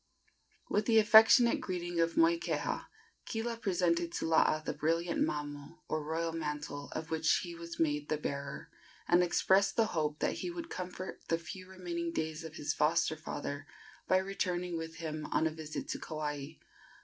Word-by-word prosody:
With 210 0 0
the 225 -2 +5
affectionate 225 +2 +7
greetings 175 -2 -3
of 165 0 +1
Moikeha, 335 +1 +2 0.4
Kila 230 +1 -3
presented 175 -5 +1
to - - -2
Laa 160 -1 +4
the 155 - -4
brilliant 165 +3 0
mamo, 145 -1 -4
or 155 -1 -1
royal 165 +2 -1
mantle, 150 -2 -4
of 160 0 -5
which 160 0 +3
he 175 -2 -6
was 170 0 -8
made 150 -2 +1
the 155 - +1
bearer, 140 -1 -5 0.4
and 175 +1 +5
expressed 190 +2 +3
the 225 - +4
hope 150 -2 0
that - - -1
he 360 - -3
would 340 -1 -6
comfort 185 +1 -6
the 165 - +2
few 185 +3 -9
remaining 170 -2 -4
days 160 0 -3
of 160 -1 -8
his 145 -1 -1
foster 160 +1 +2
father 145 -2 -5 0.4
by 185 - +5
returning 180 -2 -1
with 165 0 -5
him 155 -2 -4
on - - +1
a 160 - +1
visit 155 -1 -6
to - - -2
Kauai. 150 -3 -4
165 Hz, 170 wpm, -33 LUFS, 155-185 Hz, 0.4 s, affectionate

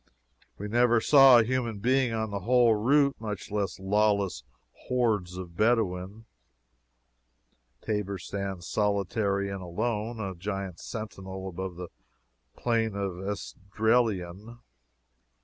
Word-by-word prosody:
We 105 - -5
never 120 +1 +3
saw 135 0 +7
a 115 - +5
human 120 -2 -1
being 125 +3 +2
on 110 -1 -2
the 100 - -2
whole 120 +3 +4
route, 140 +6 +3
much 105 -4 -6
less 100 -3 -2
lawless 100 -4 +1 0.4
hordes 105 -8 0
of 90 -2 -8
Bedouins. 105 -1 0 1.6
Tabor 105 -2 -2
stands 95 -1 -5
solitary 100 -1 0
and 100 -1 -5
alone, 110 +5 -3
a 95 -3 -3
giant 95 0 -5
sentinel 95 -3 -7
above 95 0 -5
the 90 0 -7 0.7
Plain 115 -3 0
of 100 -3 -3
Esdraelon. 105 0 -1
105 Hz, 115 wpm, -28 LUFS, 95-115 Hz, 1.6 s, saw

